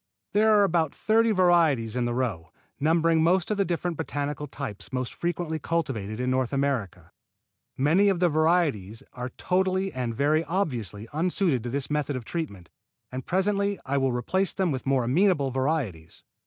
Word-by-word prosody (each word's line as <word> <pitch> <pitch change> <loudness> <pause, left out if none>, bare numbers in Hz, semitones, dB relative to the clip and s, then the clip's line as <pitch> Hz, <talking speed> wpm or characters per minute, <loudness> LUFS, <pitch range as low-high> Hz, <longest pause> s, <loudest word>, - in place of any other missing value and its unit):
There 220 +1 +4
are - - +5
about 165 -5 +1
thirty 225 +1 +2
varieties 170 - +3
in 125 -1 0
the 120 - -1
row, 110 -11 -2 0.3
numbering 165 +2 +3
most 175 +4 +2
of 210 - 0
the 200 - +3
different 175 -1 -2
botanical 145 -2 -3
types 130 -7 -7
more 130 -1 -1
frequently 170 +2 -3
cultivated 125 -11 -2
in 125 0 0
North 130 -2 0
America. 135 -8 -2 0.7
Many 165 +9 +4
of 190 -3 0
the 180 - +4
varieties 155 - +1
are 125 0 -5
totally 190 +1 0
and 125 -3 -3
very 150 +5 +2
obviously 120 - -3
unsuited 170 - +1
to - - -2
this 140 +3 -1
method 150 -1 -1
of 125 -3 -5
treatment, 100 - -5 0.4
and 130 0 -6
presently 200 +2 0
I 140 +1 0
will 135 -1 +1
replace 180 +11 0
them 185 -4 0
with 130 -1 -4
more 135 -2 +2
amenable 145 +1 +2
varieties. 130 - -2
150 Hz, 170 wpm, -26 LUFS, 125-175 Hz, 0.7 s, are